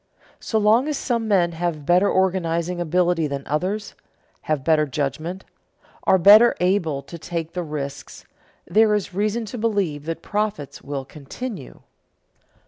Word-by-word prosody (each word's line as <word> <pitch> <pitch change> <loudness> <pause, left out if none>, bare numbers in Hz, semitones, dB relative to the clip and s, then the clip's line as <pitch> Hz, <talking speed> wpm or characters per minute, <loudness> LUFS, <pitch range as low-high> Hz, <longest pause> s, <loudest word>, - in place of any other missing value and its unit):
So 220 - -2
long 220 +6 +3
as 300 -2 -1
some 235 -3 -1
men 180 -5 +3
have 165 -3 -3
better 180 +5 +4
organizing 175 -2 0
ability 175 -1 +1
than 140 -1 -5
others, 185 +8 -2 0.6
have 150 -4 0
better 155 0 +3
judgment, 155 +7 -4 0.6
are 190 - +5
better 210 +6 +7
able 175 -6 0
to 170 - -10
take 165 0 -5
the 180 - -2
risks, 150 -4 -6 0.4
there 210 +4 +3
is 205 -2 -3
reason 215 +4 -1
to 230 +3 -7
believe 195 -10 -1
that 165 0 -5
profits 205 -9 -3
will 140 -1 -5
continue. 150 - -8
175 Hz, 140 wpm, -22 LUFS, 155-205 Hz, 0.6 s, better